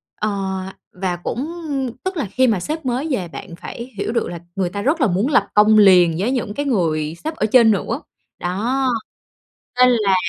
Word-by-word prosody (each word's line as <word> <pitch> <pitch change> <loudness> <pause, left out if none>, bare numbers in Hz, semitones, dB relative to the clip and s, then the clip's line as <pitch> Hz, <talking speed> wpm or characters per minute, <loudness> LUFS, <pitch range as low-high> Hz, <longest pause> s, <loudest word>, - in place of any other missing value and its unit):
ờ, 215 - -1 0.6
và 180 -1 -2
cũng 240 - -3 0.6
tức 375 -1 -3
là 280 - -1
khi 255 +7 +1
mà 215 -6 +2
sếp 310 - -4
mới 255 +4 -1
về 185 -9 -1
bạn 170 +1 -9
phải 235 +8 -8
hiểu - - -2
được 235 - 0
là 170 -1 -6 0.2
người 185 -2 0
ta 200 +3 -4
rất 295 +6 +1
là 260 - +4
muốn 195 +6 +1
lập - - +3
công 215 +1 +5
liền 180 -5 +6
với 220 +7 0
những 235 -5 -2
cái 285 +4 -3
người 160 - 0
sếp 315 +1 -3
ở 215 - 0
trên 230 -1 +6
nữa, 230 +7 -1 0.4
đó. 240 +9 0 0.9
Nên 250 0 +7
là 210 -5 +2
215 Hz, 200 wpm, -20 LUFS, 185-255 Hz, 0.9 s, Nên